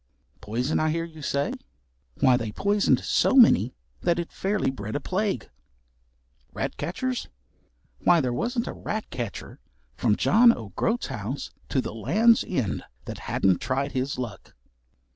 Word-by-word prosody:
Poison, 125 +8 -1
I 155 - +2
hear 165 +1 -1
you 160 -2 -12
say? 140 0 -1 0.7
Why, 130 -1 +6
they 115 -3 -2
poisoned 200 - +2
so - - +2
many 130 - +6 0.3
that 170 -1 +2
it 170 -1 -3
fairly 195 -7 0
bred 110 -4 -6
a - - +1
plague. 190 - -2 1.1
Ratcatchers! 255 +8 -3 0.7
Why 175 -1 +4
there 125 -5 0
wasn't 235 - -1
a - - -5
ratcatcher 125 - -5 0.3
from 110 -4 +1
John 235 - +6
o' - - -8
Groat's 235 +2 0
house 125 +2 -5 0.2
to 130 - +1
the 115 - -6
Land's 215 - +3
End 110 - -1 0.2
that - - -6
hadn't 95 -2 +2
tried 135 +2 -1
his 130 +1 -2
luck. 115 -7 -7
140 Hz, 140 wpm, -26 LUFS, 120-200 Hz, 1.1 s, Why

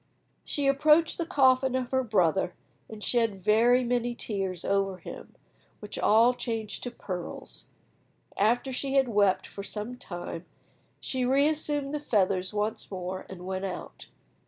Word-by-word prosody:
She 285 - -2
approached 300 +5 +4
the 335 - -1
coffin 260 -2 +3
of 255 -2 -2
her 260 0 +2
brother, 185 -5 +1 0.3
and 215 -1 -9
shed 225 -6 0
very 235 +5 +4
many 240 0 0
tears 195 -6 -2
over 195 -1 +1
him, - - -10 0.4
which 210 - -7
all 230 +4 +5
changed 225 -4 -4
to - - -2
pearls. 185 -7 -7 0.7
After 240 +6 +1
she 275 +2 -2
had 270 -1 +4
wept 200 -3 +3
for 200 - -8
some 210 +4 -5
time, 175 -1 -6 0.5
she 260 -1 -2
reassumed 290 +2 +1
the 300 - -1
feathers 195 -8 +1
once 210 +1 -2
more, 185 -1 -5
and 180 -1 -9
went 190 +1 -3
out. 185 - -7
225 Hz, 145 wpm, -28 LUFS, 195-260 Hz, 0.7 s, all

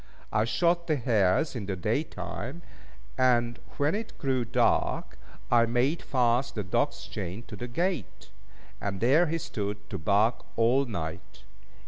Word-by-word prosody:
I 105 +1 +3
shot 170 +7 +1
the 155 - +3
hares 115 - +2
in 105 -5 -4
the 100 - -1
day 90 - 0
time; 130 - -6 0.6
and 120 -2 +3 0.2
when 145 +3 +2
it 215 +2 -4
grew 130 -2 0
dark, 115 - +1 0.3
I 115 -1 +5
made 125 +7 +1
fast 125 -1 +1
the 105 - -2
dog's 90 - -1
chain 95 +7 -5
to - - -9
the 120 - -5
gate, 170 - -3 0.5
and 100 -1 -2
there 140 - +4
he 165 +2 0
stood 105 -8 -4
to 95 - -3
bark 105 +7 +2
all 120 +5 +3
night. 90 -6 -6
120 Hz, 150 wpm, -28 LUFS, 105-140 Hz, 0.6 s, I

